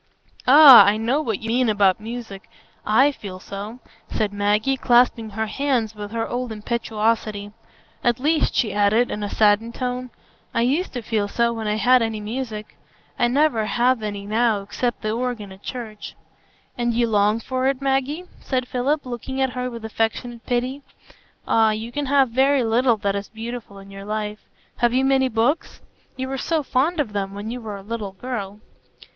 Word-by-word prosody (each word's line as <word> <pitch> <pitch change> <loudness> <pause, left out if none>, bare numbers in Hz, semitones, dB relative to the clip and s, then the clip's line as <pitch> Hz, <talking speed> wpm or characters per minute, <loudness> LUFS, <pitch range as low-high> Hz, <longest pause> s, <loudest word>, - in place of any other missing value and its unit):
"Ah! 280 -1 +10
I 205 +1 +3
know 240 +7 0
what 225 -9 -3
you 225 - -5
mean 245 0 +2
about 200 -3 +3
music; 220 -3 -8 0.4
I 265 +7 +5
feel 195 -8 -9
so," 200 +5 -7 0.3
said 210 -2 -1
Maggie, 210 +6 +1
clasping 240 -3 +3
her 220 +2 -2
hands 245 -2 -1
with 210 -1 -7
her 225 +1 -2
old 245 -1 -3
impetuosity. 215 -1 -2 0.5
"At 240 0 +2
least," 305 +3 +1
she 215 -5 +1
added, 210 +4 +2
in 210 - -4
a 205 - -3
saddened 215 +3 +2
tone, 250 0 -3 0.5
"I 230 - +2
used 285 +10 0
to 245 -3 -5
feel 215 -2 -1
so 235 +3 +1
when 225 -2 -4
I 210 - +1
had 245 +4 +4
any 225 -1 -1
music; 215 -1 -6 0.4
I 240 - +4
never 255 -3 +2
have 245 +1 +2
any 205 -2 -5
now 215 -1 +1
except 240 +3 -3
the 215 - -1
organ 230 -3 -3
at 190 +1 -13
church." 220 -4 -7 0.6
"And 240 -1 -1
you 240 0 +3
long 210 0 +2
for 260 +3 -2
it, 270 -1 0
Maggie?" 275 +5 -1
said 255 -2 -2
Philip, 275 +5 -1
looking 255 +2 -5
at 265 -1 +1
her 250 0 -3
with 230 -2 -8
affectionate 225 +2 -2
pity. 255 +3 -1 0.7
"Ah, 225 -1 +4
you 220 +2 -3
can 290 +2 -3
have 275 -2 +3
very 265 +2 +3
little 235 +1 +2
that 200 -1 -1
is 200 0 -4
beautiful 225 -2 -7
in 195 0 -12
your 195 0 -9
life. 210 0 -3 0.4
Have 240 0 +2
you 265 +1 +3
many 265 -1 +3
books? 235 +8 0 0.4
You 260 0 -3
were 270 0 -4
so 320 +1 0
fond 290 +6 0
of 225 -8 -1
them 195 -1 -3
when 205 +2 -5
you 250 0 -5
were 210 -3 -6
a 195 - -11
little 210 -2 -5
girl." 210 -2 -6
230 Hz, 185 wpm, -22 LUFS, 210-255 Hz, 0.7 s, Ah